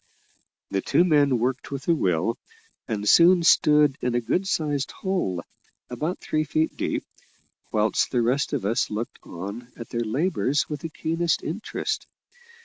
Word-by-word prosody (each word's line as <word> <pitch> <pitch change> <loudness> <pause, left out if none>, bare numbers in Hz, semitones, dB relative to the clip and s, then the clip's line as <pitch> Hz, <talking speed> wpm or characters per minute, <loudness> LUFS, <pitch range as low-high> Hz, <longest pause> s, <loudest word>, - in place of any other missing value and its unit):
The 95 - 0
two 170 - +3
men 145 -6 +3
worked 125 +3 -2
with 140 -1 -6
a 170 - +5
will, 95 - 0 0.5
and 105 -1 -3
soon 175 - +6
stood 150 -3 +4
in 125 -1 0
a - - +3
good 180 +11 -1
sized 145 -7 -1
hole, 180 - -2 0.5
about 155 +9 -2
three 155 0 -1
feet 155 +1 0
deep, - - -2 0.7
whilst 105 0 +1
the 120 -2 +1
rest 130 +4 +1
of - - -1
us 110 +3 +1
looked 110 +3 -5
on 100 +8 -8
at 115 - -8
their 120 - -2
labours 140 +3 0
with 150 -1 -5
the 165 - -5
keenest 165 +1 -1
interest. 185 +8 -3
140 Hz, 155 wpm, -25 LUFS, 115-160 Hz, 0.7 s, soon